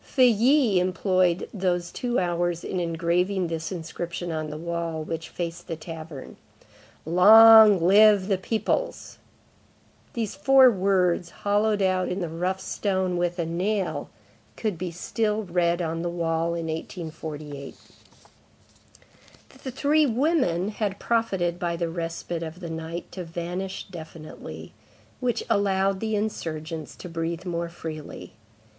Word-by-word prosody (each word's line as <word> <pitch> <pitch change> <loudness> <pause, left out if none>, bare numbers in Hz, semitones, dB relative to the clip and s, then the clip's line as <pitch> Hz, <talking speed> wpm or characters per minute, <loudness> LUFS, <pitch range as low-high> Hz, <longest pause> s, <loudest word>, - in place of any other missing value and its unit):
Feuilly 250 -3 +4
employed 185 -1 +1
these 180 -3 -1
two 245 -1 -2
hours 175 -1 0
in 185 - -3
engraving 175 +3 0
this 160 -1 -4
inscription 170 0 -5
on 155 -1 -3
the 150 - -6
wall 170 -1 -3
which 160 +1 -5
faced 170 0 -5
the 165 - -3
tavern:— 160 -3 -9 0.7
LONG 215 +4 +8
LIVE 200 +2 +5
THE 195 -3 +1
PEOPLES! 225 - -2 0.9
These 225 -4 -3
four 265 +4 +6
words, 185 -3 +1
hollowed 205 +1 0
out 185 -1 +1
in 180 - -2
the 175 -3 -3
rough 180 +4 -2
stone 190 -2 -1
with 175 0 -1
a 170 - -1
nail, 185 +4 -2 0.5
could 215 -4 -1
be 180 +2 -4
still 210 +5 -2
read 175 -1 0
on 165 0 -2
the 175 - -2
wall 170 -1 -1
in 165 -1 -3
1848. 155 -3 -6 1.9
The 265 - -4
three 290 +4 +2
women 240 - +1
had 205 -2 -3
profited 190 -8 0
by 170 -1 -1
the 170 0 -2
respite 165 0 -4
of 165 +1 -6
the 170 -3 -6
night 160 +1 -6
to 185 - -6
vanish 175 +3 -5
definitely; 160 -2 -9 0.5
which 245 -3 -1
allowed 195 -1 +1
the 220 0 -1
insurgents 160 -7 -4
to - - -9
breathe 165 +1 -4
more 170 -1 -3
freely. 160 -3 -8
175 Hz, 130 wpm, -25 LUFS, 165-200 Hz, 1.9 s, LONG